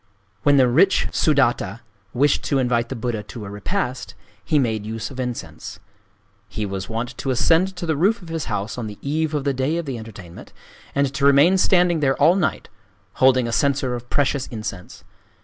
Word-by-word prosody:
When 145 +4 +4
the 130 -2 +5
rich 165 +11 +3
Sudatta 120 - +1 0.3
wished 140 +5 +2
to 140 - +1
invite 120 -2 +1
the 135 - -4
Buddha 115 -2 -3
to 105 +1 -9
a 100 - -8
repast, 125 - -3 0.3
he 125 +9 +1
made 110 -6 0
use 110 +3 -5
of 130 - -9
incense. 125 -2 -6 0.7
He 105 - -4
was 95 -1 -5
wont 115 +2 -4
to 135 - -3
ascend 165 +9 +2
to 180 -1 -5
the 160 -2 0
roof 200 +7 +1
of 170 - -11
his 165 -2 -3
house 105 +1 -3
on 115 - -4
the 105 -1 -8
eve 155 +2 -1
of 145 - -1
the 140 -1 0
day 135 +5 -1
of 170 - -3
the 130 -4 -4
entertainment, 100 -6 -11 0.4
and 140 -1 +1
to 140 - -4
remain 140 +6 +6
standing 175 -3 +3
there 135 -2 +2
all 160 +5 +5
night, 185 -5 -1 0.5
holding 130 -2 +5
a - - -3
censer 135 0 +1
of 120 0 -7
precious 140 -1 0
incense. 105 -5 -7
130 Hz, 195 wpm, -22 LUFS, 115-150 Hz, 0.7 s, remain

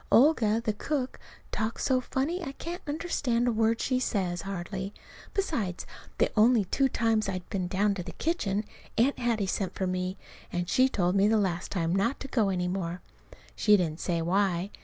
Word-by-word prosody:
Olga, 230 -5 +5
the 215 - +1
cook, 260 +4 -2 0.3
talks 220 +1 -2
so 255 -1 +2
funny 310 +8 -2
I 275 - -5
can't 345 +5 -6
understand 290 -6 0
a - - +3
word 225 0 +2
she 255 -1 +1
says, 185 -8 -1
hardly. 195 +1 -5 0.4
Besides, 235 - -1 0.3
the - - +2
only 220 -1 +5
two 270 +8 +2
times 225 -4 +1
I've 185 -2 -4
been 190 -4 -1
down 200 +3 +2
to 190 - -4
the - - -7
kitchen 215 - -1 0.3
Aunt 250 +5 +3
Hattie 230 -4 +1
sent 190 0 -2
for 190 - -1
me; 185 +1 -2 0.3
and 175 0 -2
she 255 +9 +4
told 180 -6 +1
me 200 +1 +5
the 220 +1 +4
last 185 -4 -1
time 170 -2 0
not 230 +7 +1
to - - -5
go 225 -6 +2
any 180 -2 0
more. 180 -1 -2 0.6
She 210 -1 +5
didn't 165 -3 -1
say 170 -2 -1
why. 190 +1 +1
210 Hz, 185 wpm, -29 LUFS, 185-250 Hz, 0.6 s, Olga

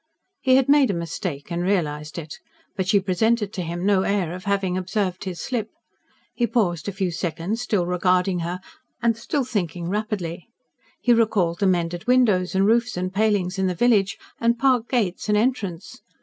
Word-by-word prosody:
He 260 -1 +4
had 265 -1 +3
made 280 -2 +5
a 195 - 0
mistake 170 -2 -5
and 170 0 -1
realised 150 -6 -1
it. 155 -3 -7 0.4
But 190 -1 -2
she 205 0 +4
presented 210 +3 +1
to 185 - -3
him 175 +1 -4
no 200 -2 +4
air 190 -4 0
of 180 0 -8
having 195 -2 0
observed 185 0 -2
his 180 -2 -5
slip. 225 -4 -3 0.6
He 240 - 0
paused 175 -10 0
a - - -1
few 190 -2 -2
seconds, 175 +7 -3
still 210 -7 0
regarding 180 +1 +1
her 175 +2 -4 0.4
and 230 -1 +3
still 270 +5 -2
thinking 175 -7 -3
rapidly. 195 -4 -3 0.5
He 245 - +3
recalled 205 -7 +2
the 200 - +2
mended 175 0 -1
windows 215 -8 +3
and 190 +1 +3
roofs 235 0 +2
and 185 +1 -3
palings 200 -3 +1
in 190 - +2
the 180 - -1
village, 205 -2 +2 0.2
the 235 0 +2
park 245 -2 +2
gates 215 -5 -1
and 210 - +4
entrance. 210 -7 -2
190 Hz, 180 wpm, -23 LUFS, 175-220 Hz, 0.6 s, made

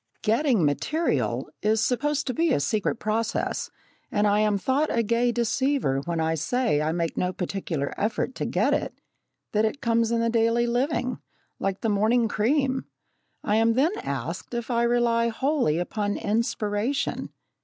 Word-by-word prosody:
"Getting 230 - +2
material" 305 - 0
is 215 +1 +2
supposed 290 +5 0
to 255 - -2
be 330 +2 +1
a - - +3
secret 210 +11 0
process, 220 0 -2 0.4
and 205 - +2
I 205 0 +3
am 210 -1 +2
thought 270 +9 +1
a 230 - +1
gay 235 +2 +2
deceiver 240 - +1
when 170 -1 -2
I 160 0 +1
say 225 - 0
I 155 +1 0
make 165 -1 -2
no 180 - 0
particular 175 -6 -3
effort 220 +4 -1
to - - -2
get - - +1
it - - -2 0.6
that 210 0 +2
it 220 +6 -1
comes 230 -3 +1
in 235 0 +1
the 230 0 +1
daily 230 +1 +2
living 250 0 -1 0.4
like 195 0 -2
the 225 - 0
morning 220 +3 +3
cream! 260 +5 +1 0.6
I 210 - +2
am 225 +1 +4
then 275 +8 +3
asked - - -4
if 235 +1 -3
I 235 -1 +2
rely 235 -1 +2
wholly 255 - +1
upon 205 +3 -2
"inspiration." 220 +4 -1
230 Hz, 165 wpm, -25 LUFS, 205-250 Hz, 0.6 s, am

